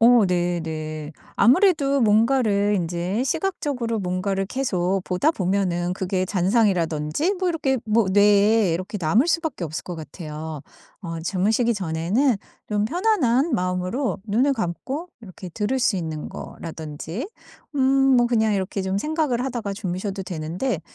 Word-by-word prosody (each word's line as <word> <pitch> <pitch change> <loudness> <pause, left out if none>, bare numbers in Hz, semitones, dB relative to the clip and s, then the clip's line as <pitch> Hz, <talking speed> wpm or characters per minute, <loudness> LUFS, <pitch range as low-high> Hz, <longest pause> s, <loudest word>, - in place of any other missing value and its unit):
어 235 -1 +6
네네. 160 -4 -2 0.2
아무래도 280 - +4
뭔가를 215 -2 +3
인제 180 +6 -1
시각적으로 285 - -1
뭔가를 190 +1 -1
계속 195 -7 0
보다 185 - +1
보면은 180 - 0
그게 185 0 -1
잔상이라든지 185 - +1
뭐 370 -1 -1
이렇게 285 -6 0
뭐 220 -1 +2
뇌에 205 0 +4
이렇게 185 +5 -4
남을 195 - +3
수밖에 325 - -1
없을 155 0 -5
것 175 - -6
같아요. 155 -1 -7 0.4
어 165 -3 -5
주무시기 210 +7 +1
전에는 195 - +1 0.3
좀 210 -1 0
편안한 320 - +2
마음으로 185 +6 -1
눈을 245 +7 +2
감고 260 - -4
이렇게 185 -3 -10
들을 220 +8 -1
수 230 -4 +2
있는 160 -4 -4
거라든지 160 - -7 0.5
음 265 0 +3 0.2
뭐 240 - +4
그냥 220 -3 +2
이렇게 195 0 -2
좀 190 +1 -1
생각을 300 -3 0
하다가 240 -6 -3
주무셔도 195 0 -4
되는데 175 +4 -3
200 Hz, 310 characters per minute, -23 LUFS, 175-250 Hz, 0.5 s, 어